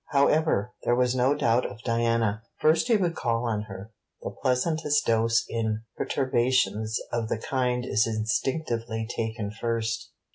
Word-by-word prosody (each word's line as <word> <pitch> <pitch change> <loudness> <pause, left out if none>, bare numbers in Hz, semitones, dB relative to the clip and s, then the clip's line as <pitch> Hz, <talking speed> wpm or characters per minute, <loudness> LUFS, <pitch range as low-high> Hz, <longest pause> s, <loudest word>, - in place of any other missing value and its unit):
However, 140 -5 +2
there 120 - +2
was 125 0 +2
no 130 +3 +2
doubt 120 -1 +2
of 110 - -7
Diana. 115 -2 +1 0.2
First 155 +8 +3
he 230 -3 +4
would 175 -4 0
call 115 0 -1
on 105 -2 -1
her. 95 +2 -9 0.3
The - - -4
pleasantest 145 +3 +1
dose 115 0 +2
in 110 -1 -2
perturbations 120 -4 +1
of 115 -2 -1
the - - 0
kind 125 +1 -1
is 110 -1 +2
instinctively 115 0 -1
taken 110 -2 -3
first. 115 0 -2
115 Hz, 145 wpm, -27 LUFS, 110-130 Hz, 0.3 s, he